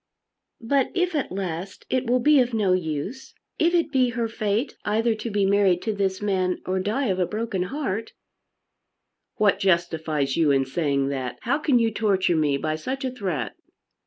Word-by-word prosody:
"But 265 +3 +1
if 360 0 +1
at 290 - -1
last 185 -1 -5
it 255 -2 -1
will 250 +1 +3
be 295 +3 +5
of 245 -2 +1
no 200 -4 +2
use, 180 - -3 0.2
if 340 +2 +3
it 335 -3 +1
be 260 -3 +3
her 235 -1 -1
fate 220 +3 -1
either 225 +2 +1
to 220 +2 -5
be 205 -2 +1
married 195 -2 +3
to 220 - -1
this 195 -1 -1
man 185 -3 0
or 185 +1 0
die 215 +9 -1
of 190 -5 0
a 180 - +1
broken 215 -3 -2
heart 225 -6 -3 0.6
" - - -56
"What 205 -2 +3
justifies 160 -6 0
you 160 -3 +3
in 135 -1 +3
saying 140 -1 0
that? 130 -3 -4
How 280 +5 0
can 285 -4 +3
you 230 -1 +2
torture 195 -5 +1
me 150 -3 +2
by 155 +2 -2
such 265 - -4
a 260 - -1
threat?" 180 - -3
200 Hz, 190 wpm, -24 LUFS, 170-240 Hz, 0.6 s, be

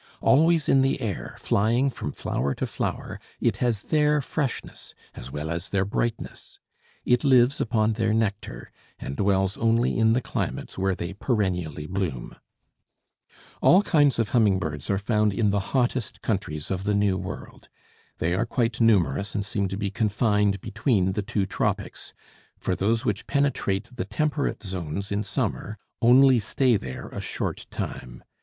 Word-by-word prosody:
Always 160 +2 +4
in 135 - +5
the 135 +1 +1
air, 110 - -4
flying 120 +7 +1
from - - -5
flower 70 +2 -2
to - - -2
flower, - - -4 0.2
it - - +1
has 115 -4 0
their 150 -1 +2
freshness 140 -1 -4 0.2
as - - -9
well 75 +3 -4
as 85 0 -3
their 100 -1 +1
brightness. 115 +3 -4 0.5
It 125 +2 +3
lives 130 -1 +4
upon 110 -1 +1
their 110 0 0
nectar, 105 - -2 0.3
and 70 - -6
dwells 95 0 +1
only 115 +1 +2
in 110 0 +4
the 120 - +2
climates - - -4
where 95 0 0
they 85 +2 -5
perennially 90 - -1
bloom. 85 -8 -3 1.3
All 190 +3 +6
kinds 145 - +3
of 115 -2 0
humming 105 -6 +3
birds 75 -5 -4
are 100 - +2
found 105 0 +1
in 105 -1 +2
the 100 - +1 0.2
hottest 125 -2 -1
countries 95 -8 -2
of 95 0 -2
the 105 0 +1
New 100 -2 +2
World. 95 +1 -8 0.5
They 85 +2 0
are 110 +6 0
quite 115 0 -1
numerous 95 -5 +2
and 100 - -1
seem 100 -1 -1
to 95 +1 -4
be 100 -1 -2
confined 105 -2 +1
between 105 -3 +1
the 105 - -1
two 100 -1 -1
tropics, - - -3 0.4
for 90 - -1
those 115 +6 0
which 105 -2 -1
penetrate 125 -6 0
the 90 - -3
temperate 145 +7 -1
zones 95 0 -4
in 100 +1 0
summer 105 +1 -3 0.2
only 130 +1 +6
stay 120 +3 +2
there 65 -10 -5
a - - -6
short - - -4
time. - - -6
105 Hz, 160 wpm, -25 LUFS, 95-120 Hz, 1.3 s, All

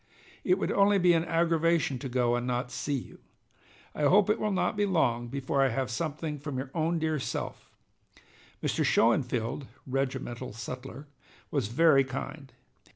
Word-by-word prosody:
It 365 - +3
would - - -1
only 200 0 +4
be 180 -2 +5
an 165 0 +2
aggravation 165 -4 +1
to 135 - -5
go 120 -1 +1
and 120 0 -2
not 125 0 -2
see 140 +3 -2
you. 125 - -10 0.7
I 150 - -1
hope 200 +6 +5
it - - 0
will 215 - 0
not 190 - 0
be 205 0 +1
long 120 -10 +1
before 135 +2 -1
I 135 - +4
have 130 +1 -2
something 155 +2 -3
from 145 -2 -5
your 130 +1 -5
own 165 +1 0
dear 155 -1 0
self. - - -5 0.9
Mr. - - +1
Schoenfield 120 +2 +1 0.2
[regimental 130 -3 -3
sutler] 125 +5 -7 0.5
was - - 0
very 140 +3 +5
kind. 135 +1 -6
140 Hz, 160 wpm, -29 LUFS, 125-165 Hz, 0.9 s, be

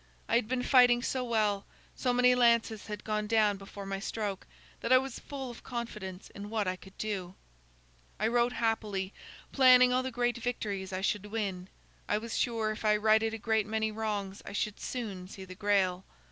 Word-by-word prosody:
I - - -3
had 235 -2 +2
been 250 +1 -1
fighting 245 -2 +5
so 260 -1 -1
well, 215 -4 +1 0.3
so 250 - 0
many 250 0 +5
lances 235 -3 +3
had 210 -1 -6
gone 215 -1 -1
down 215 -2 +3
before 195 0 -9
my 195 0 -3
stroke, 205 -2 -4 0.3
that 230 - -3
I 255 - +9
was 265 -1 -3
full 270 -3 -6
of 235 - -12
confidence 210 -6 -6
in 205 +1 -8
what 215 -3 -1
I 185 - 0
could 190 +1 -16
do. 195 -4 -4 0.8
"I 215 - +2
rode 240 +1 +2
happily, 215 -4 -1 0.4
planning 255 -2 +7
all 255 - +3
the 260 - -3
great 245 0 0
victories 205 -6 -3
I 185 0 -3
should 205 +1 -1
win. 200 -4 -3 0.4
I 210 - +3
was 225 +1 -5
sure 225 -3 0
if 215 - -6
I 210 -1 +4
righted 220 +1 +3
a - - -5
great 220 -1 0
many 220 0 0
wrongs, 210 -3 -3
I - - -8
should 210 0 -2
soon 200 -8 -5
see 190 0 -9
the 185 - -9
Grail. 190 -2 +1
215 Hz, 195 wpm, -31 LUFS, 200-240 Hz, 0.8 s, I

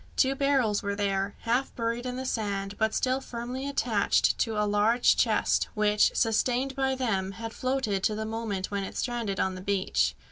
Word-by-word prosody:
Two 265 0 +3
barrels 270 -6 +1
were 200 -1 -2
there, 200 0 -1
half 245 +4 0
buried 235 +1 -2
in 250 - -3
the 260 +1 -4
sand, 200 -4 -2
but 220 0 +1
still 260 +1 +1
firmly 250 +3 -5
attached 225 -6 +2
to 225 -2 0
a 210 - +2
large 210 +4 +3
chest, - - +2
which, 210 -1 +3
sustained 250 +4 +1
by 265 -1 0
them, 195 -7 -1
had 225 +2 -6
floated 255 -7 -1
to 215 - +1
the 220 +1 -3
moment 220 -4 -3
when 200 -1 -1
it - - -7
stranded 235 -5 -2
on 190 - +1
the 185 - -7
beach. 195 0 0
225 Hz, 185 wpm, -28 LUFS, 200-255 Hz, -, Two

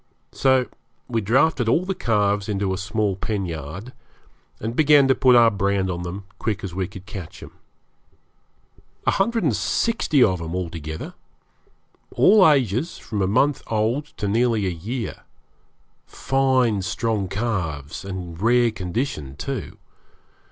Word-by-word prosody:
So 130 -1 +3 0.4
we 115 -3 -1
drafted 120 +3 +2
all 170 +9 +2
the 195 - -1
calves 105 - 0
into 100 -2 -1
a - - -3
small 105 0 -1
pen 100 0 -3
yard, 85 - -7 0.7
and 115 +2 -4
began 145 -2 +5
to 135 - +5
put 130 -1 +4
our 115 -1 +6
brand 100 -2 0
on 85 0 -4
them 90 +3 -6
as 100 - -31
quick 110 -2 -2
as 95 -3 -5
we 95 0 -2
could 95 -1 -12
catch 95 -5 -9
'em. - - -11 1.5
A - - +4
hundred 225 +2 +1
and 140 -9 +2
sixty 160 - +1
of 95 -4 +1
'em 85 +1 -5
altogether 80 -4 -5 1.0
all 195 -4 +6
ages, 135 - +1
from 105 -3 -4
a 95 - +2
month 130 +7 +2
old 115 +6 0
to 105 - -2
nearly 115 0 +1
a - - +1
year. 105 +7 -5 0.9
Fine 130 -6 +1
strong 105 +1 -1
calves, 90 - -3
and 90 -4 -7
in - - -6
rare 120 0 +4
condition, 90 - -4
too. 130 - -5
105 Hz, 150 wpm, -23 LUFS, 95-125 Hz, 1.5 s, our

